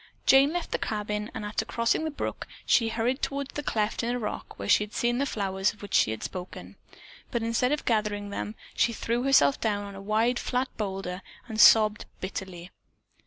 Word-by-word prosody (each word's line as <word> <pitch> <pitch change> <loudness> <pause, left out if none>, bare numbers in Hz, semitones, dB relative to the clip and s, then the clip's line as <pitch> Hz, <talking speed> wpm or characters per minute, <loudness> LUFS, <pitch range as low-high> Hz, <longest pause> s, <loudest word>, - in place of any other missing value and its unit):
Jane 275 +2 +6
left 350 0 -3
the - - 0
cabin, 210 0 -3
and 220 -3 -4
after 210 +1 -2
crossing 230 +7 0
the - - -1
brook, 295 - -5 0.2
she 230 -1 +3
hurried 235 +4 -1
toward 280 0 -2
the 295 - -5
cleft 215 -6 -1
in 235 - -2
a 245 - 0
rock 215 -4 -5
where - - -5
she - - +5
had 210 - -10
seen 240 +1 +1
the 280 - +1
flowers 195 -4 -1
of 210 - -16
which 205 - -8
she - - +4
had 110 0 -4
spoken, 180 0 -7 0.5
but 235 -3 -2
instead 230 +3 +1
of 295 - -1
gathering 210 -3 0
them, 210 +1 -4 0.2
she 235 - +2
threw 235 +2 -1
herself 250 - +4
down 205 -2 0
on 200 - -8
a 195 - -9
wide, 220 +4 +1
flat 255 +1 -2
boulder 190 -3 -4 0.3
and 220 -2 +1
sobbed 215 -1 +6
bitterly. 185 -2 -6
220 Hz, 205 wpm, -27 LUFS, 205-245 Hz, 0.5 s, Jane